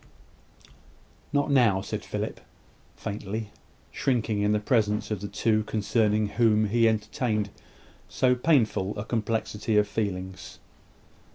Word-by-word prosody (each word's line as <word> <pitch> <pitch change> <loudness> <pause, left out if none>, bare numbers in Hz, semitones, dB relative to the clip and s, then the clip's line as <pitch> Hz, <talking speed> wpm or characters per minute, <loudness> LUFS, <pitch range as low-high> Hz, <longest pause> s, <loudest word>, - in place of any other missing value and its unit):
"Not 145 0 +1
now," 115 -8 +4
said - - -5
Philip, - - -4 0.6
faintly, 105 0 -5 0.4
shrinking 115 -5 0
in 105 0 +2
the 105 - +2
presence 105 -1 +1
of 105 -3 -2
the 100 - -4
two 110 +1 +1
concerning 110 0 +1
whom 110 0 +2
he 115 +1 +4
entertained 105 -1 -1 0.6
so 125 -1 +3
painful 120 - +1
a 105 - -4
complexity 110 -1 -1
of 105 0 +4
feelings. 95 -3 -4
110 Hz, 115 wpm, -27 LUFS, 105-115 Hz, 0.6 s, now